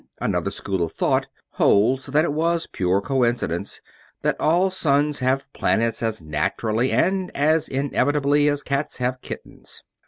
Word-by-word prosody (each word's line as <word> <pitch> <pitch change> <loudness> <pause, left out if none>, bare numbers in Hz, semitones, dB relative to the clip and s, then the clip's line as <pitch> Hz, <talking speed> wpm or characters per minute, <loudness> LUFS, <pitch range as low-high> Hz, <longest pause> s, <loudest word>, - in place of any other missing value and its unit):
Another - - -1
school 95 -2 -3
of 85 - -2
thought - - +1 0.2
holds 125 +7 +2
that 150 +4 +2
it 145 - -1
was 165 +2 0
pure 95 +1 0
coincidence; 125 0 -1 0.4
that - - +1
all 180 +4 +2
suns 150 -4 +2
have 135 +1 -1
planets 115 0 0
as 110 -6 -2
naturally 110 +11 -1
and 190 0 +1
as 155 +3 +2
inevitably 145 +1 +1
as 145 0 -1
cats 140 +1 -2
have 125 +1 -2
kittens. - - -9
135 Hz, 145 wpm, -23 LUFS, 115-150 Hz, 0.4 s, holds